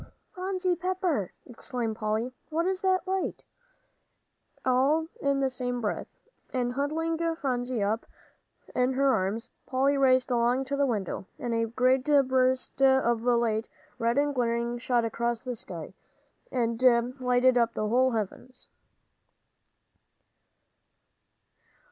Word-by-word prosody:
"Phronsie 370 -1 -1
Pepper!" 355 - -1
exclaimed 240 -2 -4
Polly, 215 0 -1
and 250 +1 -7 0.2
"What's 345 +4 0
this 375 -1 +3
light?" 380 0 -2 1.2
all 270 +5 +3 0.2
in 280 -1 +1
the 270 - +2
same 245 -1 -3
breath. 215 -3 -2 0.4
And 245 -1 -1
huddling 320 +4 -1 0.2
Phronsie 250 -6 -1
up 215 +3 -1 0.7
in 250 +1 +1
her 270 0 +3
arms, 200 +4 -2 0.2
Polly 275 +2 +2
raced 255 -1 +4
along 245 +2 +2
to 280 +2 -2
the 280 0 +2
window. 200 -5 -3
A 230 -2 0
great 255 +3 +2
burst 260 -3 +2
of 265 -4 +4
light, 235 -2 +1 0.3
red 235 +2 +1
and 290 0 +2
glaring, 235 -1 -1
shot 240 -1 +1
across 235 +1 -1
the 250 -1 -4
sky, 175 -6 -8 0.6
and 235 -2 -1 0.4
lighted 250 0 +3
up 235 -1 +2
the 215 - -1
whole 255 +3 +3
heavens. 230 +4 -5
255 Hz, 120 wpm, -28 LUFS, 235-275 Hz, 1.2 s, raced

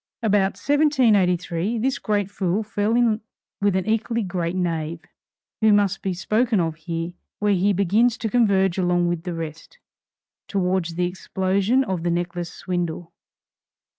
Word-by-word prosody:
About 200 -3 +2
1783, 220 - +2
this 260 +4 0
great 205 -3 -1
fool 195 +1 -1
fell 210 +1 0
in 235 -2 +2 0.4
with 200 -2 +2
an 190 - 0
equally 225 +1 0
great 175 -2 -2
knave, 165 -2 -2 0.6
who 220 0 +5
must 205 -2 +2
be 195 - -1
spoken 215 +5 +1
of 165 -2 0
here, 165 +2 -4 0.2
where 210 0 +2
he 195 +2 +2
begins 210 +5 +2
to 225 - -3
converge 195 -5 +2
along 175 -1 +2
with 170 0 -3
the 175 -2 -3
rest, 165 - -7 0.7
towards 180 -3 -1
the 180 +1 +1
explosion 190 +6 0
of 190 -8 -3
the 175 - -1
necklace 175 0 -2
swindle. 175 -2 -4
190 Hz, 145 wpm, -23 LUFS, 175-215 Hz, 0.7 s, who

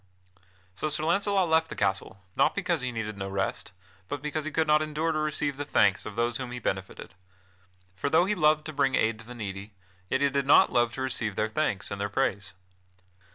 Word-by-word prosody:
So 155 +11 -3
Sir 150 +1 +1
Launcelot 195 +2 +2
left 160 0 +2
the - - -6
castle, 100 -1 -2
not - - +3
because 180 -6 0
he 130 0 -2
needed 105 -3 -5
no 95 0 -4
rest, 95 -1 -3 0.4
but 145 - -4
because 150 0 -3
he - - -2
could 160 0 +1
not 150 0 +4
endure 155 +1 -1
to 155 - -1
receive 150 -2 -1
the 145 - -2
thanks 105 -9 +2
of 105 - -7
those 120 0 0
whom 130 -2 -5
he 125 - -5
benefited. 95 -5 -4 0.8
For 120 +10 -2
though 160 +4 +4
he 210 - +1
loved 155 -4 +3
to 155 - -6
bring 135 -2 +2
aid 110 0 +1
to 115 - -12
the 125 - -9
needy, 100 -2 -6 0.4
yet 130 - 0
he 140 - +4
did 140 0 -1
not - - +6
love 120 -1 +3
to 130 - -5
receive 115 -5 -2
their 110 +2 0
thanks 115 -5 -1
and 100 - -4
their 100 - -1
praise. 100 -5 -1
130 Hz, 220 wpm, -28 LUFS, 105-155 Hz, 0.8 s, not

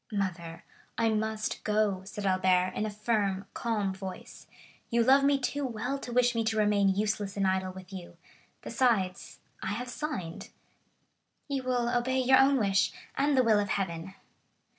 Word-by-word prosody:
"Mother, 175 -5 -3 0.3
I 230 - +2
must 220 0 -2
go," 210 -3 +1
said 205 +1 -6
Albert 185 -1 +2
in 215 - -1
a - - -3
firm, 205 -2 -1
calm 210 -5 -1
voice; 190 -1 -9 0.4
"you 235 -1 +3
love 270 +3 +5
me 280 0 +4
too 280 +2 -2
well 250 +2 -3
to 245 - -7
wish 245 0 +3
me 230 -1 0
to 220 0 0
remain 205 -2 +3
useless 205 -1 -1
and 195 - +1
idle 190 0 0
with 185 0 -12
you; 180 -2 -9 0.5
besides, 215 -8 0 0.2
I - - -4
have 245 +4 -4
signed." 245 - -5 1.1
50145m - - 0
"You 270 - -1
will 245 -1 0
obey 260 +2 +1
your 260 +1 +5
own 270 +1 +5
wish 195 -4 +2 0.2
and 280 0 +2
the 255 - +5
will 220 -3 +4
of 205 -1 -1
Heaven!" 190 -1 -3
215 Hz, 170 wpm, -29 LUFS, 190-245 Hz, 1.1 s, love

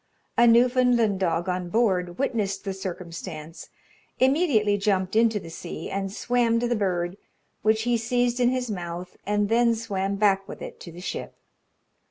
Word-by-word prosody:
A 240 - +5
Newfoundland 240 -3 +4
dog 175 -2 0
on 180 -1 -2
board 180 -5 +1
witnessed 225 -8 -1
the 195 -2 -3
circumstance, 170 -3 -7 0.5
immediately 260 - +3
jumped 195 -1 0
into 225 -1 +3
the 165 -3 -10
sea, - - -7
and 195 0 -2
swam 235 +1 +1
to 240 - 0
the 240 - +1
bird, 180 -3 -1 0.4
which 220 0 +2
he 240 0 +2
seized 245 +1 0
in 245 -1 +4
his 250 -2 -1
mouth, 175 -1 -6
and 205 0 +1
then 230 +1 +3
swam 200 -3 -2
back 195 -1 +2
with - - -8
it - - -8
to 170 - -10
the 175 +2 -10
ship. - - -5
205 Hz, 165 wpm, -25 LUFS, 185-235 Hz, 0.5 s, A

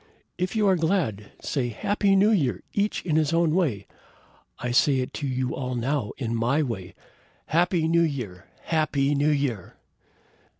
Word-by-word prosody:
If 185 +4 -1
you 215 -2 +3
are 190 - +5
glad, 160 - -1
say 130 -4 -1
Happy 200 - +1
New 200 +3 +5
Year! 145 - +1
each 205 -2 -1
in 155 -3 +1
his 155 0 +1
own 165 -2 +3
way! 140 - 0 0.7
I 125 - -3
say 135 +2 +4
it 130 -1 -3
to 145 - -1
you 130 -1 -1
all 130 -2 -3
now 125 -2 -1
in 115 -4 -3
my 125 +7 +1
way. 100 -9 -5 0.5
Happy 170 0 +2
New 170 +1 +3
Year! 120 - -3 0.2
Happy 150 -3 +1
New 145 +1 +2
Year!" 140 -10 -1
145 Hz, 165 wpm, -25 LUFS, 125-170 Hz, 0.7 s, are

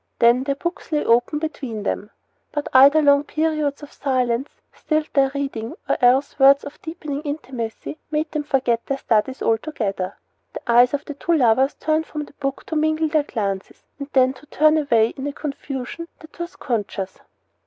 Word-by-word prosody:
Then 240 +2 +4
their 275 0 0
books 345 +3 -5
lay 300 -1 +1
open 240 +6 +3
between 265 -8 -4
them; 205 0 -3 0.4
but 295 -1 -3
either 280 +4 +7
long 285 0 +5
periods 305 -2 -1
of 290 - -11
silence 255 -1 0 0.2
stilled 310 -1 -1
their 275 -1 +4
reading, 260 -5 -3
or - - +2
else 255 +4 +3
words 275 +1 +7
of 285 - -10
deepening 310 -3 -5
intimacy 270 -2 -5
made 305 0 -1
them 305 - -1
forget 260 -5 0
their 275 - -1
studies 255 +1 0
altogether. 215 -6 -1 0.4
The - - -6
eyes 245 +3 +5
of 285 - -6
the 290 - -6
two 320 +4 -1
lovers 265 0 +3
turned 315 +1 0
from 300 -1 -5
the - - -18
book 275 -1 -4
to 320 - -4
mingle 315 +1 +1
their 310 -1 +3
glances, 200 -9 -4 0.2
and 280 0 -6
then 260 -1 +4
to 290 +3 -17
turn 310 +1 +4
away 230 -7 +3
in 270 +2 -6
a 285 - -3
confusion 280 +2 -5
that 315 0 -15
was 345 +1 -5
conscious. 205 -6 -3
280 Hz, 180 wpm, -22 LUFS, 245-305 Hz, 0.4 s, either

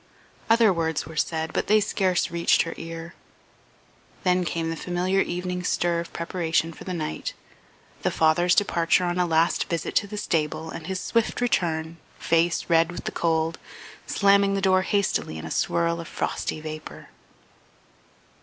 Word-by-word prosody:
Other 225 -3 +5
words 160 -2 -1
were 160 +2 -10
said, 160 +1 -1
but - - -1
they 215 +1 +5
scarce 190 -4 0
reached 170 0 +3
her 165 - -5
ear; 165 +1 -7 1.1
then 180 -1 +3
came 165 0 -2
the - - -3
familiar 180 +3 0
evening 180 0 -3
stir 170 -1 +1
of 170 0 -6
preparation 165 -1 -1
for - - -12
the 185 - -3
night, 115 - -4 0.7
the - - +1
father's 175 +3 +3
departure 170 -3 +2
on 175 0 -1
a 180 - +2
last 165 +1 +2
visit 165 -2 -2
to 205 - +1
the 210 +1 -7
stable 160 -4 -1
and 160 - -7
his 190 0 -2
swift 230 +3 0
return, 165 -8 0 0.2
face 165 +1 +1
red 165 0 +3
with 175 - -7
the - - -3
cold, 165 -1 0 0.5
slamming 200 0 +3
the - - 0
door 190 -1 +3
hastily 195 - 0
in 80 - -7
a 80 - -6
swirl 170 0 0
of 165 - -9
frosty - - -3
vapour. 155 0 -8
170 Hz, 165 wpm, -25 LUFS, 160-185 Hz, 1.1 s, Other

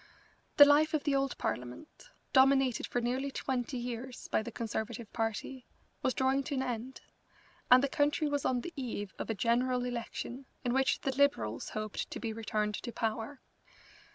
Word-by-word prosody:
The 290 - +12
life 305 +2 +4
of 300 - -1
the 290 - +1
old 275 -1 0
Parliament, 125 - -5 0.2
dominated 265 -2 +4
for 245 - -1
nearly 255 +4 -1
twenty 260 -1 -2
years 245 +1 -5
by - - +2
the 235 +2 -6
Conservative 225 -1 -4
Party, 230 +3 -3 0.3
was 255 - 0
drawing 265 +1 +2
to 280 - -2
an 265 - 0
end, 250 +1 -4 0.7
and 255 +1 +8
the - - +3
country 290 +2 +1
was 285 -1 -1
on 250 -1 +1
the 340 - -7
eve 230 -7 -4
of - - -4
a 225 - 0
general 245 +3 +1
election 245 +2 -5 0.2
in 245 - +1
which 265 0 +2
the 270 -1 -1
Liberals 265 - +1
hoped 215 -1 -4
to - - -6
be 225 -2 -3
returned 215 -1 -1
to 240 - -5
power. 225 +4 -3
250 Hz, 175 wpm, -32 LUFS, 230-270 Hz, 0.7 s, The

